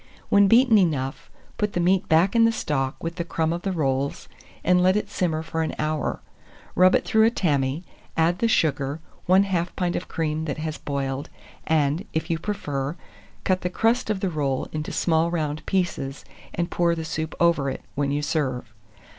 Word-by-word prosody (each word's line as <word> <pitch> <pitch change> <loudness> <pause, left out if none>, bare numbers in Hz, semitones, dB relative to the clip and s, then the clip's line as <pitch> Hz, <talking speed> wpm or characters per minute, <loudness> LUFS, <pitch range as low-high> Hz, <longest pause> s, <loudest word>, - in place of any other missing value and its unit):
When 200 0 +6
beaten 230 0 +6
enough, 135 -6 -1 0.3
put 210 -1 0
the - - 0
meat 185 +2 +2
back 170 +7 +4
in 230 - +6
the 230 - +5
stock, 135 -10 -2
with 165 0 -4
the 170 - -1
crumb 165 -1 -1
of 170 - -4
the 195 - -2
rolls, 140 -5 -1 0.4
and 180 0 +4
let 185 +1 +4
it 210 0 -3
simmer 160 -4 -1
for 160 0 -3
an 160 - -2
hour; 155 0 -2 0.5
rub 185 +1 +5
it - - +1
through 220 0 +4
a - - +6
tammy, 145 - 0 0.3
add 170 +2 +2
the 230 - +2
sugar, 145 -7 +1 0.3
1/2 185 -2 +3
pint 175 -1 -1
of 180 - -3
cream 160 -1 -2
that 145 - -3
has 155 0 -4
boiled, 140 -1 -3 0.4
and, 155 +2 +1
if 160 +2 -2
you 165 - 0
prefer, 145 -7 -3 0.5
cut 185 -1 +1
the 180 - -1
crust 225 +5 +1
of 205 -3 -1
the 195 - 0
roll 140 -4 -1
into 155 0 -4
small 165 0 +2
round 155 -3 -2
pieces, 160 -8 -2 0.3
and 170 0 -2
pour 170 -1 +2
the 160 -1 -4
soup 160 0 -4
over 170 -5 +3
it, 135 - -6
when 140 0 -1
you 145 +1 -1
serve. 130 -7 -2
165 Hz, 190 wpm, -24 LUFS, 145-185 Hz, 0.5 s, When